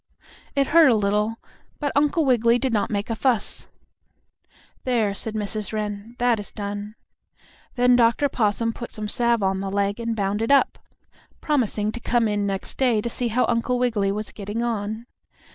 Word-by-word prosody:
It 280 -1 +3
hurt 320 0 +6
a 235 - +4
little, 210 +2 +1 0.4
but 285 -2 -1
Uncle 295 +2 +2
Wiggily 235 -2 +4
did 260 -1 -1
not 210 - +1
make 205 +1 -2
a - - 0
fuss. 240 -2 -1 1.2
"There," 230 -6 +1
said 220 +2 -4
Mrs. 210 -1 -3
Wren, 210 +1 -4
"that 240 -2 +2
is 205 - -7
done." 205 +1 -5 0.8
Then 245 0 +4
Dr. 235 +4 +3
Possum 230 -2 0
put 235 - -8
some 215 -1 -4
salve 235 0 +1
on 190 0 +1
the 195 0 -3
leg 200 +2 -1
and 230 -1 -2
bound 200 0 -1
it 225 - -1
up, 280 - +3 0.6
promising 225 -8 0
to 240 - -6
come 235 -1 +1
in 205 -1 0
next 195 -1 -4
day 245 -5 +3
to 235 +2 -3
see 245 - -1
how 235 +3 +2
Uncle 240 +1 0
Wiggily 220 -6 +1
was 210 +1 -4
getting 210 +3 -4
on. 220 -1 -3
225 Hz, 180 wpm, -23 LUFS, 205-245 Hz, 1.2 s, hurt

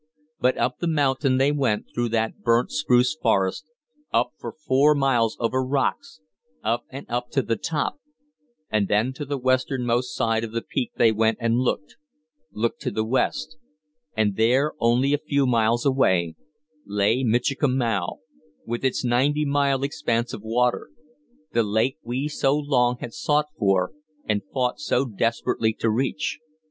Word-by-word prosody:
But 130 +1 +2
up 125 - -1
the 175 - -1
mountain 140 -4 +1
they 135 +2 +3
went 135 -8 0
through 120 -1 -1
the 110 0 0
burnt 120 +1 +2
spruce 125 -4 +2
forest, 100 -9 0 0.5
up - - +1
for - - -6
four 150 0 +3
miles 125 -5 +1
over 130 +3 0
rocks, 145 - -2 0.4
up 115 +2 -1
and 135 +1 -8
up 120 +1 -3
to 135 - +2
the 115 - 0
top; 155 - -2 0.7
and 105 -2 +1
then 110 +6 +1
to 145 +2 -6
the 140 0 -3
westernmost 125 -1 0
side 115 -2 +1
of 115 -1 -6
the 115 - -2
peak 125 - -3
they 115 -2 +4
went 110 0 +1
and 115 0 +1
looked 130 +4 -2 0.5
looked 115 +2 -2
to - - -1
the 110 +1 -1
West; 155 +6 -1 0.6
and 105 -3 +1
there, 130 +7 +3
only 125 +4 +2
a 145 - +2
few 140 -2 0
miles 120 0 +2
away, 95 -12 +2 0.5
lay 105 +5 +1
Michikamau 120 - 0 0.4
with 120 +2 -4
its 130 -1 0
ninety 140 +5 +2
mile 140 -1 +1
expanse 130 -5 -1
of - - -6
water 120 +3 0 0.6
the 115 - +3
lake 110 +5 0
we 125 +5 -3
so 145 -1 +1
long 125 -4 +1
had 120 - -6
sought 150 -1 0
for 95 -6 +1 0.3
and 105 -1 0
fought 125 -1 -1
so 140 -3 +1
desperately 115 -1 0
to 110 0 0
reach. 135 +7 -1
125 Hz, 155 wpm, -24 LUFS, 115-140 Hz, 0.7 s, they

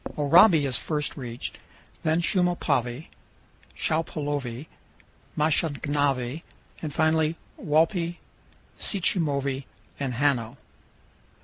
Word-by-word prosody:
Oraibi 160 +2 +6
is 125 -4 0
first 150 +5 -3
reached, 120 -4 -6 0.4
then 160 +1 +1
Shumopavi, 160 - 0 0.7
Shupaulovi, 145 -5 -2
and - - -29 0.7
Mashongnavi, 145 -3 +1 0.4
and 155 - -4
finally 160 +1 +2 0.2
Walpi, 165 +3 +1 0.6
Sichumovi, 140 -8 0 0.3
and 135 -3 -2
Hano. 130 -2 0
150 Hz, 80 wpm, -26 LUFS, 135-160 Hz, 0.7 s, Oraibi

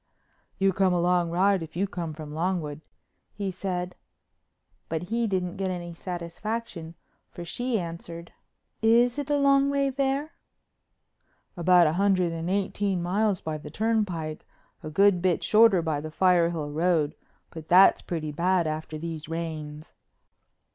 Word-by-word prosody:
"You 195 0 +2
come 190 0 +2
a - - +1
long 175 0 +2
ride 190 +2 +2
if 160 -1 -8
you 190 +3 +1
come 175 -4 -5
from 150 -1 -8
Longwood," 160 -3 -2 0.5
he 200 -2 -3
said. 180 -1 -4 0.9
But 165 +3 -4
he 235 0 +1
didn't 180 -3 -2
get 195 0 -1
any 175 -2 -5
satisfaction, 175 +1 -5 0.3
for 175 - -9
she 245 +6 -1
answered: 170 -1 -7 0.5
"Is 235 +4 +4
it 285 0 -4
a 290 - +2
long 275 0 +4
way 280 -1 +1
there?" 275 +3 -1 1.2
"About 175 0 +5
a 155 - +2
hundred 185 -4 +2
and 165 +1 -4
eighteen 195 -1 -1
miles 200 +2 0
by 155 -1 -4
the - - -9
turnpike—a 185 -9 -3
good 195 +2 +3
bit 180 -2 +1
shorter 210 -5 +5
by 155 -3 -1
the 155 - -6
Firehill 170 -3 +2
Road, 160 -2 +1 0.4
but 160 -2 -9
that's 185 +2 +6
pretty 160 -4 -4
bad 175 +3 +1
after 155 0 -4
these 160 -1 -6
rains. 155 -2 -6
180 Hz, 145 wpm, -26 LUFS, 165-200 Hz, 1.2 s, that's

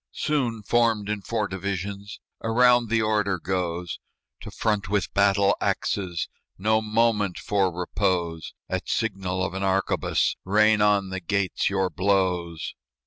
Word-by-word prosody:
Soon, 125 -8 -1
formed 115 -2 +2
in 105 -1 -2
four 110 +1 -2
divisions, 100 +1 -5 0.2
Around 120 0 +4
the 115 0 +2
order 105 -3 +1
goes 90 -1 -3 0.4
"To - - -9
front 105 -3 -1
with 100 -4 -1
battle 100 0 +3
axes! 90 -4 -1 0.3
No 110 +3 +2
moment 105 -3 +1
for 100 -3 +1
repose. 90 -2 -2
At - - -3
signal 95 -4 -1
of 95 - -4
an 95 - -4
arquebus, 95 0 +1
Rain 105 +2 +4
on 100 -2 +3
the 95 - -3
gates 95 +1 0
your 95 -1 0
blows." 90 -4 0
100 Hz, 135 wpm, -25 LUFS, 95-110 Hz, 0.4 s, Around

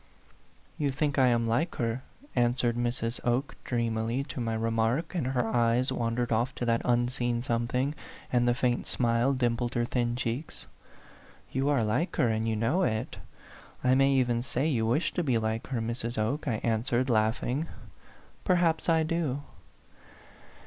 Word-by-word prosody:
" - - -33 0.3
You 145 -2 +1
think 145 +1 0
I 130 - +6
am 120 -1 +2
like 120 +10 0
her," 115 +1 -1 0.3
answered 120 0 +2
Mrs. 120 0 -2
Oke, 125 +4 0
dreamily, 115 +1 -1
to 125 - -4
my 115 -1 -1
remark, 115 +8 0
and 165 -8 -1
her 125 -3 0
eyes 120 +2 +2
wandered 120 -1 -1
off 120 +4 +1
to 120 - -3
that 115 -1 +2
unseen 120 0 0
something, 125 +3 0 0.4
and 120 0 +3
the 120 - +3
faint 120 -1 0
smile 120 +2 +2
dimpled 120 -2 0
her 120 0 +1
thin 120 -1 0
cheeks. 125 +4 -4 0.9
"You 135 +2 0
are 140 -5 +3
like 110 - 0
her, 120 - +3
and 110 0 0
you 110 - +1
know 115 - +1
it. 110 -11 -1 0.7
I 130 0 +4
may 135 +1 +4
even 120 -3 +2
say 130 +3 -1
you 115 -8 +1
wish 125 +9 +1
to 180 - 0
be 130 -6 +2
like 110 0 -2
her, 125 -3 -2
Mrs. 120 0 -3
Oke," 130 +8 -1
I 120 - +1
answered, 120 +2 +1
laughing. 120 +6 +1 0.8
"Perhaps 175 -3 +2
I 160 -1 +4
do." 155 -4 -1
120 Hz, 165 wpm, -29 LUFS, 115-135 Hz, 0.9 s, I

